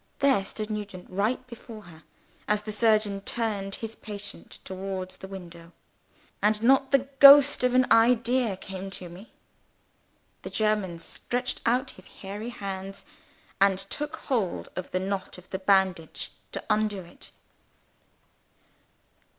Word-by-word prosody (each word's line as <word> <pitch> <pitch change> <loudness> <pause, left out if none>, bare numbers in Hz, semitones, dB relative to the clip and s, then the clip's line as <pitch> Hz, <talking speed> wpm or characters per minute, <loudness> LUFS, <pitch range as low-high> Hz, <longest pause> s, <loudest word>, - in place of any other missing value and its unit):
There 275 -8 +3
stood 215 +2 -4
Nugent 205 -4 -6
right 210 +7 0
before 230 -3 -11
her, 160 -3 -15 0.5
as 210 0 +1
the 215 - -5
surgeon 210 -2 +2
turned 200 -2 -2
his 225 0 -6
patient 205 -1 -9
towards 190 -1 -5
the 190 - -9
window. 170 -3 -10 0.7
And 210 +1 +2
not 265 +2 +5
the 275 -1 +2
ghost 280 -1 +9
of 250 0 +2
an 255 0 +5
idea 235 -1 +4
came 195 0 -7
to 180 - -9
me! 190 +8 -13 1.1
The - - -6
German 210 -5 0
stretched 245 +9 -3
out 255 +3 +1
his - - -15
hairy 205 +4 -7
hands, 195 -3 -6 0.5
and 195 -1 +4
took 290 +11 -4
hold 235 - -2
of 185 - -5
the 185 - -1
knot 190 0 -3
of 180 0 -16
the 190 - -3
bandage 190 -4 +1 0.2
to - - -4
undo 210 -2 +1
it. 170 -1 -13
205 Hz, 135 wpm, -27 LUFS, 190-235 Hz, 1.1 s, ghost